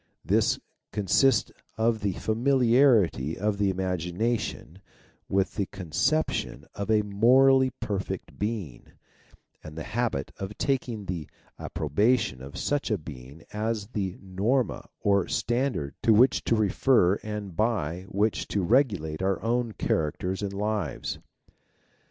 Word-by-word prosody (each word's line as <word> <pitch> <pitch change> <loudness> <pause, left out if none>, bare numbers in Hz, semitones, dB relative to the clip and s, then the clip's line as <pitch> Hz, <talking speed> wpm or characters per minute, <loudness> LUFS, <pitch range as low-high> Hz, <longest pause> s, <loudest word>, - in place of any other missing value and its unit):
This - - +2 0.3
con 105 - -2
sists 130 +6 +3 0.3
of 110 0 +2
the 100 -2 -1
familiarity 115 - +3
of 105 +1 -1
the 100 -1 +2
imagination 95 +1 -2 0.5
with 95 0 +1
the 100 - -2
conception 95 - -1
of 100 +1 -5
a 110 -1 +4
moralty 130 +6 +5
perfect 95 -2 -4
Being, 105 - -4 0.8
and 80 0 -10
the 80 - -4
habit 115 - -2
of 95 +2 -6
taking 125 -6 -1
the 85 -5 -5 0.3
approbation 100 - 0
of 70 +2 -9
such 145 -2 -1
a 105 - +1
Being 75 -1 -11
as 105 -1 -2
the 100 -6 -3
norma 105 +7 -1
or 100 -3 +2
standard 120 - -1
to 110 - +5
which 125 +4 +4
to 115 - +3
refer 105 -2 +3
and 105 -4 -6
by 95 -5 -1
which 105 +2 0
to 100 - -1
regulate 95 - +1
our 95 0 +1
own 120 0 0
characters 90 +5 -1
and 100 -1 -2
lives. 100 -5 -2
105 Hz, 130 wpm, -27 LUFS, 90-115 Hz, 0.8 s, moralty